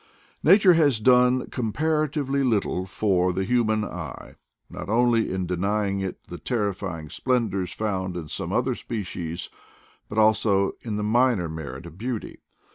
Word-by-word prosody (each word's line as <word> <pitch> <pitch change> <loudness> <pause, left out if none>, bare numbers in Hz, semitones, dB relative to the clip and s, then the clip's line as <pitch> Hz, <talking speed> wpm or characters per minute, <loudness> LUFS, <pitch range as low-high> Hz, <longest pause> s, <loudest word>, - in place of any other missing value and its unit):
Nature 185 +2 +6
has 145 -8 +3
done 125 +2 +4
comparatively 140 +3 0
little 100 -6 0
for 90 -2 +1
the 95 +2 -1
human 110 -2 +1
eye, - - -7 0.3
not 85 - -8
only 115 0 +2
in 95 -1 -2
denying 100 +3 -1
it 95 -1 -5
the 90 - -9
terrifying 100 -8 -3
splendors 110 - -1
found 95 -4 -2
in 80 -3 -6
some - - -4
other - - +1
species, 90 -6 -5 0.6
but 105 - -6
also 105 -2 +3
in 110 -3 -4
the 105 - -2
minor 115 -4 +2
merit 75 -3 -7
of 85 +2 -12
beauty. 120 -1 -4
105 Hz, 140 wpm, -25 LUFS, 95-125 Hz, 0.6 s, Nature